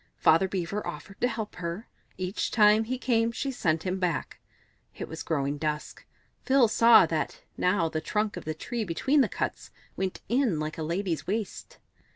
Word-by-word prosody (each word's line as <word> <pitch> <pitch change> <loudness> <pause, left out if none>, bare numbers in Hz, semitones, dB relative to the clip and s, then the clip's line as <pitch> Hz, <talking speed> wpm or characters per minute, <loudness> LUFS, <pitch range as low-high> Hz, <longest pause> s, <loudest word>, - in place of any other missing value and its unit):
Father 165 +4 +4
Beaver 190 +2 -3
offered 170 +7 -8
to 245 - +4
help 220 -4 -5
her; 175 +5 -5 0.3
each 185 +2 -2
time 215 0 +5
he 255 +3 -2
came 230 -2 +1
she 270 +4 -3
sent 165 -9 0
him 185 0 -2
back. 175 -5 -2 0.6
It - - -6
was 160 - -7
growing 145 -2 -1
dusk; 150 -1 -4 0.4
Phil 265 -3 +4
saw 230 +2 +7
that - - -3
now 180 -2 +2
the 155 0 -3
trunk 210 +4 -1
of - - -6
the 155 0 -3
tree 235 +8 -3
between 260 - +2
the - - +2
cuts - - -3 0.3
went 190 -1 -3
in 235 - +1
like 155 +1 -4
a - - -2
lady's 165 -1 -2
waist. 210 +1 -4
190 Hz, 180 wpm, -28 LUFS, 165-225 Hz, 0.6 s, saw